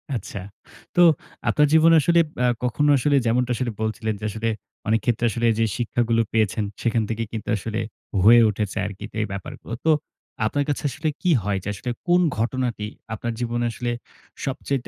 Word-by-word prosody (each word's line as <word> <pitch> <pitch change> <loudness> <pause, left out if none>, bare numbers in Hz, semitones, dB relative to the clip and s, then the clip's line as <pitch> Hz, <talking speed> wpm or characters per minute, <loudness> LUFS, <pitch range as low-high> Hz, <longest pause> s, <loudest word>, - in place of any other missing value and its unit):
আচ্ছা। 100 -2 -5 0.6
তো 175 - +5 0.5
আপনার 150 0 +4
জীবনে 165 +1 +7
আসলে 170 +3 +4 0.2
আ - - +4 0.2
কখনো 145 +5 +1
আসলে 140 +3 +2
যেমনটা 125 +2 +1
আসলে 120 0 -2
বলছিলেন 110 0 -1
যে, - - -12
আসলে 110 +2 -3 0.4
অনেক 110 +1 +3
ক্ষেত্রে 120 -1 +1
আসলে 120 +1 0
যে 115 - +4
শিক্ষাগুলো 115 -1 +1
পেয়েছেন, 110 -1 +1 0.2
সেখান 115 -1 +1
থেকে 115 0 -1
কিন্তু 110 -2 -5
আসলে 110 +3 -3 0.4
হয়ে 120 +3 +8
উঠেছে 105 0 -3
আরকি 100 -1 -7 0.2
এই 110 - +1
ব্যাপারগুলো। 100 +3 -7
তো 160 - +5 0.5
আপনার 145 +6 +1
কাছে 145 - -1
আসলে 150 +5 -4
কী 180 - +2
হয় 100 -1 0
যে, - - -7
আসলে 105 +5 -5 0.2
কোন 175 +1 +5 0.2
ঘটনাটি 120 -2 -1 0.3
আপনার 115 +2 -3
জীবনে 120 0 -1
আসলে 120 +1 -3 0.5
সবচাইতে 135 -1 -2
115 Hz, 170 wpm, -23 LUFS, 110-130 Hz, 0.6 s, হয়ে